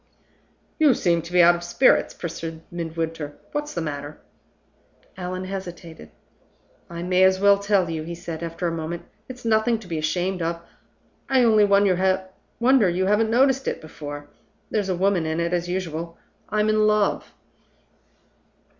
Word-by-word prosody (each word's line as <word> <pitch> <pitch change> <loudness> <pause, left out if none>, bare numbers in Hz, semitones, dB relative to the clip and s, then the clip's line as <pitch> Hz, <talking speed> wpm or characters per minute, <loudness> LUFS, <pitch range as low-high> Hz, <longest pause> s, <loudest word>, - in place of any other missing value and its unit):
"You 300 -5 +5
seem 170 -2 +1
to 170 +2 -11
be 180 -1 +5
out 175 +1 +7
of 175 0 -5
spirits?" 175 +10 +3
pursued 165 -1 -6
Midwinter. 165 -3 -4
"What's 295 0 -4
the 170 - -1
matter?" 145 -1 -5 1.0
Allan 185 0 -5
hesitated. 175 - -8 0.8
"I 170 0 -6
may 180 +1 +3
as 190 0 +4
well 200 0 +5
tell 200 -3 +2
you," 165 -1 -3
he 170 +2 -6
said, 170 -2 -7
after 170 +1 -4
a 170 - +1
moment. 165 +1 -4 0.3
"It's 250 -1 -10
nothing 225 +1 +2
to 220 - -13
be 165 -3 -3
ashamed 180 +4 -1
of; 170 +1 -2 0.7
I 260 -2 +4
only 215 -3 +5
wonder 195 +4 +2
you 180 +2 0
haven't 210 +3 +2
noticed 265 +3 +3
it - - -2
before! 145 -2 -8 0.4
There's 205 -3 -1
a 185 - +1
woman 185 -3 +1
in 160 +1 -1
it, 170 +1 -1
as 175 0 -1
usual 170 -2 -4 0.3
I'm 210 0 +1
in 215 0 +3
love." 210 -1 0
180 Hz, 155 wpm, -23 LUFS, 165-205 Hz, 1.0 s, out